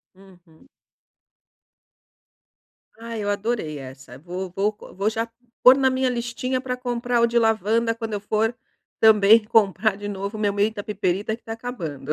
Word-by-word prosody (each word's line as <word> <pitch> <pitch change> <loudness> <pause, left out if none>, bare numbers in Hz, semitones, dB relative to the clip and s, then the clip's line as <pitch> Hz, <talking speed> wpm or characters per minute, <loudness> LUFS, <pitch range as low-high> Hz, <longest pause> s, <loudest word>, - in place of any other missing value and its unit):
Uhum. 185 +1 -20 2.3
Ai, 230 -2 -5
eu 205 - -1
adorei 205 -7 -2
essa. 130 -1 -11
Vou 180 +4 -6
vou 200 +2 +1
c - - -13
vou 195 +3 0
já 225 +1 -2 0.4
pôr 255 +1 +9
na 265 -1 +3
minha 260 0 +1
listinha 250 +1 -2
para 250 -1 -3
comprar 245 -1 -1
o 235 - +5
de 235 +1 +2
lavanda, 225 +1 +1
quando 225 -1 -5
eu 205 - -1
for, 220 +3 0 0.4
também, 220 0 +6
comprar 210 -2 +2
de 205 0 -6
novo 200 +1 -5
meu 205 -1 0
menta 205 +1 0
piperita, 205 0 -1
que 235 - -25
está 225 - -6
acabando. 170 - -6
215 Hz, 160 wpm, -23 LUFS, 195-235 Hz, 2.3 s, pôr